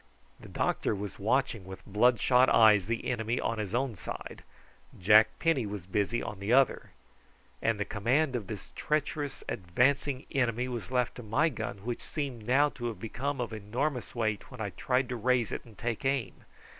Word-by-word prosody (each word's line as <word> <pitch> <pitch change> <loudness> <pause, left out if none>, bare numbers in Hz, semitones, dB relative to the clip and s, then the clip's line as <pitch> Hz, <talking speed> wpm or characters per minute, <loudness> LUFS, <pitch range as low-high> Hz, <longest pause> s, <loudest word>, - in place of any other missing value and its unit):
The - - -12
doctor - - 0
was 100 -1 -6
watching 115 0 +1
with 95 0 -10
bloodshot 125 +4 +4
eyes 105 -4 +6
the 115 0 -2
enemy 115 0 -1
on 115 - -1
his 105 0 -3
own 130 -2 0
side, 85 - -7 0.6
Jack 105 +4 +6
Penny 150 -9 +1
was 100 -3 -6
busy 105 +5 0
on 105 - -6
the 100 +3 -2
other, 135 +1 +3 0.7
and 115 -2 +1
the 100 - 0
command 125 +7 +1
of 110 -6 -3
this 105 -4 -8
treacherous 150 -2 -2
advancing 130 +9 +1
enemy 125 -2 0
was 120 -3 -5
left 125 -1 +1
to - - -6
my 120 +9 +2
gun, 105 -7 -5
which 120 -1 -3
seemed 130 -7 -5
now 140 +4 +4
to 120 -4 -5
have 110 -5 -5
become 135 +6 -3
of 120 -2 -3
enormous 125 +7 -3
weight 110 -3 -1
when 125 - -11
I 105 -3 -3
tried 125 +4 0
to 125 - -2
raise 120 -1 +1
it - - -5
and 115 -3 -16
take 120 0 -3
aim. 135 -7 -1
120 Hz, 180 wpm, -30 LUFS, 105-130 Hz, 0.7 s, eyes